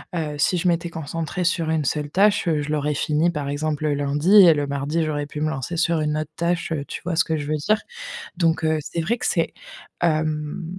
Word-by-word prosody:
heu, 155 -3 -2
si 165 +5 +2
je 175 - 0
m'étais 170 0 0
concentrée 165 +3 -4
sur 170 -2 0
une 160 -1 +1
seule 145 +1 -1
tâche, 200 +3 +3
heu, 155 -3 +2
je 145 - -5
l'aurais 150 0 0
finie, 155 +4 +1
par 145 -4 -4
exemple, 155 +1 -2
le 145 - +1
lundi 145 +6 +1
et 170 - +8
le 145 -1 -1
mardi, 140 +4 -1
j'aurais 150 -2 -2
pu 150 +1 -7
me 155 - +1
lancer 155 +2 -4
sur 170 -1 +2
une 150 0 0
autre 155 0 -3
tâche, 170 0 -1
heu, 145 -3 -2
tu - - -6
vois 175 -1 -2
ce 175 - +4
que 160 -2 -1
je 145 -1 -5
veux 155 +1 0
dire. 210 +9 +1 0.6
Donc, 165 -2 +1
heu, 160 0 +2
c'est 165 +3 -3
vrai 230 +8 0
que - - -3
c'est - - +1 0.5
hem, 155 0 0
155 Hz, 240 wpm, -23 LUFS, 150-170 Hz, 0.6 s, et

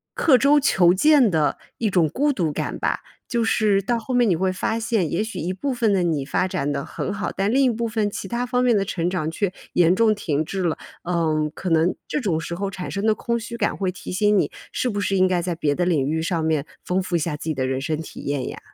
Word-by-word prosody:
刻 290 - +5
舟 290 +2 +5
求 185 -11 +4
剑 280 +3 +5
的 155 -5 +1 0.2
一 225 - 0
种 170 -5 +3
孤 285 - +1
独 170 - 0
感 - - -4
吧。 - - -1 0.3
就 235 -2 +1
是 210 -3 +2
到 235 +5 0
后 230 +3 -5
面 245 -3 +4
你 180 - +3
会 185 +3 0
发 220 +4 -1
现， 220 -7 0
也 200 - 0
许 220 +1 -6
一 175 - -2
部 265 +9 -2
分 235 -3 +1
的 190 -2 +2
你 160 -5 0
发 180 +6 0
展 145 -5 -2
得 140 -1 -3
很 195 - -4
好， 200 0 -3
但 195 +2 0
另 270 +3 +3
一 260 - +4
部 235 +1 -2
分 215 -2 -1
其 195 - -5
他 240 +4 -2
方 250 0 0
面 240 -3 +4
的 195 - 0
成 175 -2 -1
长 160 -4 -2
却 190 +3 -1 0.2
严 175 0 +4
重 220 +1 +4
停 155 -7 -1
滞 190 +4 -3
了。 170 -3 0 0.3
嗯， 160 -3 0
可 185 - -4
能 165 +2 +3
这 300 - -2
种 180 -9 0
时 170 - -5
候 195 +3 -2
产 185 -2 -6
生 200 +2 -1
的 215 - +4
空 235 +1 -2
虚 235 +1 -7
感 - - 0
会 190 -2 -1
提 185 - -8
醒 205 +2 +3
你， - - +1 0.2
是 255 - -1
不 205 -3 -1
是 200 0 0
应 185 0 +4
该 180 -1 +1
在 175 0 -2
别 150 -3 0
的 175 - -1
领 160 -7 +1
域 160 +2 0
上 165 -1 -1
面 155 -2 0 0.2
丰 185 +1 0
富 180 -1 -3
一 - - +3
下 155 -1 -2
自 150 - -9
己 160 -2 -1
的 130 -1 -1
人 130 0 -1
生 155 +3 -1
体 160 - -8
验 140 -2 -2
呀？ - - -8
185 Hz, 290 characters per minute, -23 LUFS, 165-220 Hz, 0.3 s, 刻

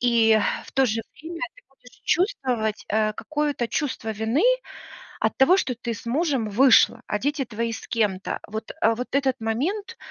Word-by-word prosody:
и 230 -2 +4 0.3
в - - -14
то 270 0 +3
же 225 0 0
время 330 +5 -8
ты - - -19
будешь 255 -2 -21
чувствовать, 255 - 0
э, 215 0 +1
какое-то 295 -2 -2
чувство 260 -6 -2
вины 220 - 0 0.8
от - - 0
того, 310 +8 +6
что 260 -8 0
ты 235 -1 -4
с 225 - -11
мужем 270 -3 0
вышла, 245 +1 +5
а 210 - -1
дети 285 +3 -1
твои 230 0 -3
с - - -7
кем-то. 205 -5 -1
Вот, 220 +1 -5
а 225 0 +3
вот 250 +2 -4
этот 265 -3 +1
момент 360 - -2
245 Hz, 170 wpm, -24 LUFS, 225-285 Hz, 0.8 s, того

